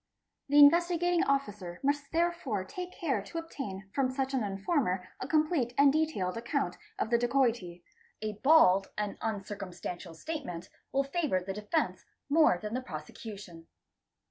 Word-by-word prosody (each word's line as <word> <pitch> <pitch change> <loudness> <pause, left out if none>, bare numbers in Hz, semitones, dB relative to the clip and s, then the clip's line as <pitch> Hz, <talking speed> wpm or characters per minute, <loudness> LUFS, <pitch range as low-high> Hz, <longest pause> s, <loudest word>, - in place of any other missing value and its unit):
The 290 - +3
Investigating 345 +3 +5
Officer 205 -11 -2
must 285 +1 0
therefore 335 - 0
take 360 - -7
care 275 - -1
to 205 +11 -8
obtain 235 -12 -6
from 270 -2 +1
such 265 +1 -2
an 260 -4 +1
informer 195 - -1
a 255 - -4
complete 305 -5 +1
and 280 0 +6
detailed 295 -13 0
account 240 +5 -1 0.2
of 235 - -2
the 235 - +4
dacoity. 235 -8 0 0.4
A 215 0 -3
bald 195 -11 +6
and 210 -1 -3
uncircumstantial 195 -5 -5
statement 180 - -6 0.2
will 275 +1 +2
favour 275 - 0
the 190 +1 -5
defence 210 - -1 0.3
more 305 - +5
than 210 +4 -6
the 255 - -1
prosecution. 175 -1 -9
240 Hz, 145 wpm, -30 LUFS, 195-295 Hz, 0.4 s, and